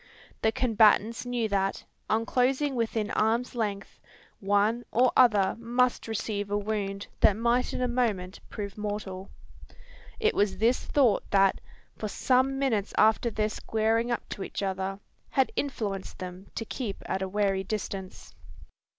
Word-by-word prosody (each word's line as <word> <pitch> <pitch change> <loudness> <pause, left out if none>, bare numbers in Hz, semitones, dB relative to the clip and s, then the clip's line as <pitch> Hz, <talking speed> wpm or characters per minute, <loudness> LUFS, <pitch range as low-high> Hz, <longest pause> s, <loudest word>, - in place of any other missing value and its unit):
The 220 - +3
combatants 225 0 +3
knew 240 -2 0
that, 195 -1 -1 0.2
on 225 +1 +1
closing 265 +4 +1
within 225 -3 -1
arms' 230 +3 +1
length, 205 -4 -3 0.4
one 205 +4 +2
or 250 +2 +4
other 210 -7 +5
must 245 +1 +1
receive 205 -2 -3
a 205 - +1
wound 200 -1 -3
that 200 - +5
might 240 +2 +1
in - - -2
a - - +2
moment 215 -7 -1
prove 200 -1 -6
mortal. 205 -2 -4 0.9
It 440 0 +2
was 200 -2 +1
this 230 +5 +2
thought 255 -8 +2
that 195 -1 +3 0.4
for 215 - -2
some 260 +5 +2
minutes 225 -7 0
after 220 +2 +4
their 215 -1 0
squaring 225 +2 0
up 235 - -2
to 195 - -5
each - - -5
other 190 0 -2 0.3
had 265 -1 +2
influenced 210 -9 -3
them 185 +1 -8
to 225 - -3
keep 220 -3 -5
at 190 - -2
a 190 - -2
wary 195 -1 +1
distance. 190 -1 -5
215 Hz, 150 wpm, -28 LUFS, 200-240 Hz, 0.9 s, other